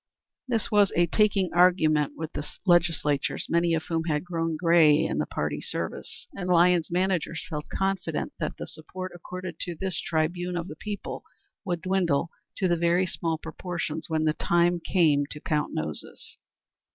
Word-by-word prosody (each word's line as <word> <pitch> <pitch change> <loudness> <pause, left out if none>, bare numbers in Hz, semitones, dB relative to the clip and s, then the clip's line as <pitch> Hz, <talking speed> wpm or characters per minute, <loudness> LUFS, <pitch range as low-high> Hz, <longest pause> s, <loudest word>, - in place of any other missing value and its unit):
This 230 -4 -1
was 205 -2 +5
a 175 - +4
taking 195 +1 +2
argument 155 -5 +4
with 160 0 -5
the 145 - -3 0.2
legislators, 165 -5 +2
many 170 0 +2
of 160 - -2
whom 165 -1 -2
had 150 -3 0
grown 165 -2 -2
gray 165 -3 +6
in - - -1
the - - 0
party - - -2
service, - - -5
and 180 -4 -4
Lyons's 175 -1 +4
managers 180 -2 0
felt 150 -3 -5
confident 195 -5 -2
that - - -3
the - - -5
support 185 +4 -8
accorded 175 -1 -7
to 175 -2 -4
this 190 +2 -2
tribune 175 +1 -1
of 170 +1 -3
the 155 - -8
people 205 +4 -5 0.4
would 175 -3 -2
dwindle 175 -5 +1 0.3
to 180 -3 +2
very 170 +2 +2
small 165 -2 -2
proportions 160 -1 -4
when 160 -1 +1
the 155 -1 +2
time 175 +2 +2
came 155 -5 +2
to 150 - -7
count 150 0 -1
noses. 75 -1 -5
170 Hz, 165 wpm, -27 LUFS, 160-180 Hz, 0.4 s, gray